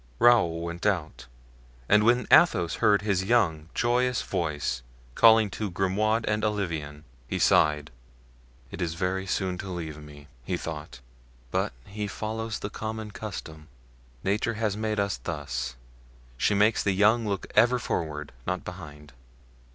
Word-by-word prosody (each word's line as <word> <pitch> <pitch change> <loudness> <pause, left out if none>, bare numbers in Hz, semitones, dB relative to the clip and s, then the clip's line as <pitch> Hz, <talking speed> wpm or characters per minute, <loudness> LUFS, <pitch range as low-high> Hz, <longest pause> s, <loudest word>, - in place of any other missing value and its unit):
Raoul 105 -9 +4
went 85 +2 -5
out, 80 -10 -2 0.6
and 105 0 +5
when 120 +1 +3
Athos 85 -1 +5
heard 105 -3 +4
his 100 -3 +1
young, 90 -8 +1
joyous 125 +1 +1
voice 75 -6 -2 0.3
calling 110 - +6
to 105 -2 -3
Grimaud 105 +5 0
and 105 0 0
Olivain, 80 -9 -2 0.2
he - - -2
sighed. 75 -1 +3 0.8
"It - - -7
is 80 -1 -2
very 95 +2 -2
soon 90 -1 -1
to 95 - -6
leave 80 -4 -5
me," 75 -1 -13 0.2
he - - -2
thought, 65 - -7 0.5
"but - - 0
he 105 +1 -5
follows 110 +3 -4
the 100 - -6
common 110 0 -5
custom. 80 -8 -8 0.6
Nature 105 +4 0
has 110 -2 -1
made 110 0 -2
us 100 0 0
thus; 65 -6 -4 0.6
she 100 +11 +1
makes 105 +2 +3
the 100 - +1
young 110 +4 +3
look 100 -1 -2
ever 120 +3 +5
forward, 75 - -3 0.2
not - - -2
behind. 75 -2 -10
100 Hz, 145 wpm, -27 LUFS, 80-110 Hz, 0.8 s, calling